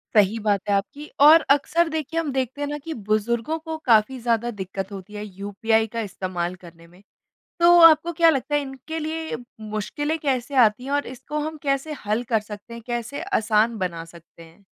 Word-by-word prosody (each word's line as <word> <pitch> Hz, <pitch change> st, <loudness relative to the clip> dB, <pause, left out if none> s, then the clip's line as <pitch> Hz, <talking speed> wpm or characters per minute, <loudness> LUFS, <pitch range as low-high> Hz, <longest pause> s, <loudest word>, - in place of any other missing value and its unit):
सही 210 Hz, +2 st, +4 dB
बात 200 Hz, -2 st, +2 dB
है -, -, +3 dB
आपकी 285 Hz, +10 st, -4 dB, 0.2 s
और 320 Hz, +2 st, +9 dB
अक्सर 325 Hz, +4 st, +2 dB
देखिए 315 Hz, +1 st, -2 dB
हम 305 Hz, -4 st, -2 dB
देखते 260 Hz, +2 st, -3 dB
हैं 290 Hz, -, -1 dB
ना 295 Hz, 0 st, -3 dB
कि 325 Hz, -, -4 dB
बुजुर्गों 225 Hz, +6 st, -1 dB
को 320 Hz, 0 st, -6 dB
काफ़ी 235 Hz, +2 st, +3 dB
ज़्यादा 235 Hz, 0 st, 0 dB
दिक्कत 195 Hz, -1 st, -6 dB
होती 195 Hz, +1 st, -9 dB
है 210 Hz, 0 st, -6 dB
यूपीआई 210 Hz, +3 st, -1 dB
का 230 Hz, -, -2 dB
इस्तेमाल 185 Hz, -1 st, -4 dB
करने 170 Hz, 0 st, -14 dB
में। 180 Hz, +3 st, -20 dB, 0.6 s
तो 345 Hz, +1 st, +7 dB
आपको 330 Hz, +1 st, +7 dB
क्या 330 Hz, 0 st, +5 dB
लगता 285 Hz, 0 st, -2 dB
है 290 Hz, -, +3 dB
इनके 270 Hz, +4 st, -7 dB
लिए 315 Hz, -4 st, -4 dB, 0.3 s
मुश्किलें 290 Hz, +9 st, -2 dB
कैसे 270 Hz, -2 st, -2 dB
आती 215 Hz, +4 st, 0 dB
हैं 275 Hz, -, -6 dB
और 285 Hz, 0 st, 0 dB
इसको 265 Hz, +4 st, -6 dB
हम 315 Hz, 0 st, -5 dB
कैसे 275 Hz, +2 st, -1 dB
हल 215 Hz, +3 st, 0 dB
कर 220 Hz, -, +4 dB
सकते 210 Hz, +2 st, -10 dB
हैं? 235 Hz, -, -9 dB
कैसे 240 Hz, +4 st, -4 dB
आसान 220 Hz, -, +1 dB
बना 170 Hz, -3 st, -3 dB
सकते 170 Hz, 0 st, -16 dB
हैं? 165 Hz, +5 st, -18 dB
235 Hz, 195 wpm, -23 LUFS, 205-295 Hz, 0.6 s, और